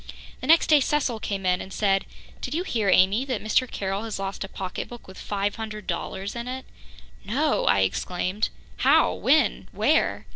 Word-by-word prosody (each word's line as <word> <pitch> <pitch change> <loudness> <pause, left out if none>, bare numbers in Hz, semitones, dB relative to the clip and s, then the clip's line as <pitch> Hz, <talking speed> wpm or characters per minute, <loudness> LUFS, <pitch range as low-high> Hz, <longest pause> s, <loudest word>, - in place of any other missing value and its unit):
The 255 - -6
next 325 +2 +6
day 305 -2 +6
Cecil 270 -4 0
came 195 -2 -3
in 180 0 +2
and 190 - -9
said: 195 -1 +1 0.3
"Did 260 - -3
you 345 - 0
hear, 225 - 0
Amy, 190 +6 +4
that 255 -5 -2
Mr. 240 +4 +2
Carroll 195 0 -3
has 220 - -4
lost 195 +1 -4
a - - -5
pocketbook 195 +6 -6
with 190 - -11
five 205 +1 -2
hundred 215 -2 -6
dollars 195 +3 -4
in 235 +1 -5
it?" 260 +1 -5 0.6
"No!" 280 +9 0
I 95 +2 +4
exclaimed. 180 - -1 0.3
"How? - - +4
When? - - +2
Where?" - - +1
210 Hz, 180 wpm, -25 LUFS, 195-250 Hz, 0.6 s, next